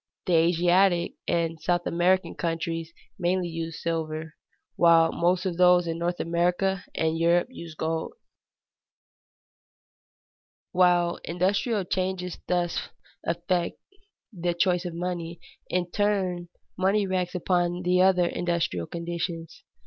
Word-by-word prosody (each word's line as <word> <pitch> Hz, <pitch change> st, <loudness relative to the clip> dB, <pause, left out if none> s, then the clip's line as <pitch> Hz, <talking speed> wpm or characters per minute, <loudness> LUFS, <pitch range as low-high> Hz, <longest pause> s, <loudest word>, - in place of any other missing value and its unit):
The 180 Hz, -, +1 dB
Asiatic 175 Hz, +2 st, +3 dB
and 165 Hz, -1 st, 0 dB
South 175 Hz, +2 st, 0 dB
American 180 Hz, +2 st, +2 dB
countries 165 Hz, -1 st, -3 dB, 0.3 s
mainly 180 Hz, 0 st, 0 dB
use 165 Hz, -1 st, -5 dB
silver, 160 Hz, -1 st, -3 dB, 0.4 s
while 165 Hz, -1 st, +5 dB
most 180 Hz, +2 st, +1 dB
of 180 Hz, -3 st, -2 dB
those 180 Hz, -1 st, +5 dB
in 165 Hz, 0 st, -3 dB
North 175 Hz, +1 st, -1 dB
America 180 Hz, +3 st, 0 dB
and 160 Hz, 0 st, 0 dB
Europe 170 Hz, +5 st, +3 dB
use 170 Hz, -9 st, -9 dB
gold. 160 Hz, +1 st, -2 dB, 2.6 s
While 175 Hz, -1 st, +3 dB
industrial 195 Hz, +5 st, 0 dB
changes 185 Hz, -1 st, -2 dB
thus 175 Hz, -1 st, -1 dB, 0.3 s
affect 170 Hz, +1 st, -1 dB, 0.6 s
the 175 Hz, -2 st, -2 dB
choice 180 Hz, 0 st, +1 dB
of 175 Hz, -2 st, -5 dB
money, 170 Hz, -1 st, -4 dB, 0.3 s
in 180 Hz, -1 st, -1 dB
turn 190 Hz, -4 st, 0 dB, 0.3 s
money 195 Hz, +2 st, +2 dB
reacts 185 Hz, -1 st, -2 dB
upon 175 Hz, 0 st, 0 dB
the 180 Hz, +1 st, +3 dB
other 185 Hz, -1 st, +4 dB
industrial 170 Hz, -, -1 dB
conditions. 170 Hz, -1 st, -5 dB
175 Hz, 115 wpm, -26 LUFS, 170-180 Hz, 2.6 s, while